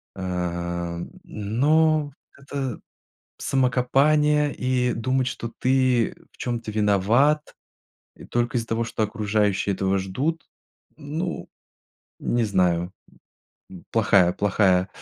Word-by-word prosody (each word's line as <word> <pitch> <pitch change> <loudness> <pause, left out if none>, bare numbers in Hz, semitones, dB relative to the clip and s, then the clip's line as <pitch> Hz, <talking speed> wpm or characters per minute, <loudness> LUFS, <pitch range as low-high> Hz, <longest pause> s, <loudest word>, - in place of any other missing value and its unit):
А, 85 -2 -3 0.2
но 145 +8 +1 0.3
это 140 -4 -4 0.6
самокопание 145 +3 +2
и 125 -1 0
думать 130 +3 0
что 115 -2 -5
ты 130 -3 +2 0.2
в - - -26
чём-то 120 -3 -3
виноват, 110 +9 +2 0.6
э, - - -12
только 120 0 -1
из-за 115 - -1
того 115 +1 0
что 110 -1 -3
окружающие 105 -2 0
этого 95 +1 0
ждут, 130 - -2 0.5
ну, 160 +4 -4 0.7
не 120 -1 0
знаю. 90 -3 +1 0.8
М. 90 -2 -12
Плохая 100 -5 +4
плохая 95 -2 +2
115 Hz, 100 wpm, -24 LUFS, 95-135 Hz, 0.8 s, Плохая